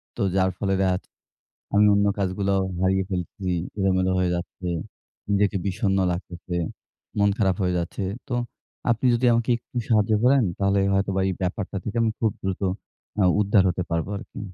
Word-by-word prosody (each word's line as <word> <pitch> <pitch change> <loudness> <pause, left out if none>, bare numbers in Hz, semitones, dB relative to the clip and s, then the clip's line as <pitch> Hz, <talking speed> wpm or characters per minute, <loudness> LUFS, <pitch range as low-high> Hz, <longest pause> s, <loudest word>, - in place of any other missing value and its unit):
তো - - -4
যার 95 -1 +3
ফলে 95 0 0
দেখা 95 -1 +2 0.8
আমি 105 +1 +6
অন্য 100 0 +3
কাজগুলাও 95 0 +1 0.2
হারিয়ে 95 +1 +2
ফেলছি। 90 0 -3 0.3
এলোমেলো 95 -1 +2
হয়ে 90 -1 +2
যাচ্ছে। 90 +1 -6 0.6
নিজেকে 100 0 +2
বিষণ্ণ 95 0 0
লাগতেছে। 90 0 -5 0.6
মন 100 0 +4
খারাপ 95 -3 +2
হয়ে 90 -1 +1
যাচ্ছে। 85 +3 -3 0.2
তো, 125 - -2 0.6
আপনি 115 +2 -1
যদি 120 +2 +1
আমাকে 115 +1 0
একটু 125 +2 -10
সাহায্য 110 -2 +3
করেন 130 +1 +5 0.2
তাহলে 100 0 +2
হয়তো 100 +1 +1
বা, 95 - +2
এই - - 0
ব্যাপারটা 95 +2 -2
থেকে 105 - -5
আমি 115 -1 +2
খুব 110 -2 +2
দ্রুত 95 0 -3 0.6
অ্যা 100 - +4 0.2
উদ্ধার 100 -1 +4
হতে 90 0 -1
পারবো 85 +2 -1
আরকি। - - -10
95 Hz, 165 wpm, -24 LUFS, 95-105 Hz, 0.8 s, আমি